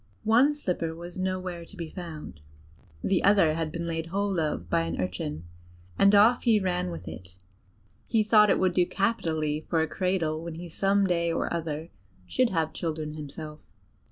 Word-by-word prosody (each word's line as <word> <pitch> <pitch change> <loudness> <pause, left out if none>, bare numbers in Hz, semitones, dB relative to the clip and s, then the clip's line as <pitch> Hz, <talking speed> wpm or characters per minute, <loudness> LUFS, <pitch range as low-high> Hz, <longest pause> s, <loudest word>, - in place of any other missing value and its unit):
One 245 +7 +4
slipper 175 - -2
was 175 +2 -8
nowhere 185 -2 -3
to 195 +4 -14
be 170 -2 -4
found; 160 - -8 0.6
the 190 - +1
other 195 -6 +5
had 160 -1 -2
been 170 +1 -4
laid 165 -1 -3
hold 195 +1 -1
of 150 - -2
by 85 - +2
an 85 0 -3
urchin, 85 -4 -3 0.5
and 200 +1 +5
off 225 +4 +6
he 225 -3 +4
ran 180 -2 -1
with 170 - -7
it; 90 0 -10 0.7
he 225 -2 +2
thought 210 -1 +5
it - - +4
would 185 -1 +2
do 175 0 +3
capitally 160 -7 -1
for 165 - +2
a - - -1
cradle 165 -4 -1
when 170 -1 -6
he 175 +2 -7
some 195 +4 +2
day 170 -2 +1
or - - -1
other 160 -1 -4 0.3
should 255 - +1
have 165 -5 -1
children 155 -2 -3
himself. 150 0 -8
170 Hz, 180 wpm, -27 LUFS, 155-195 Hz, 0.7 s, off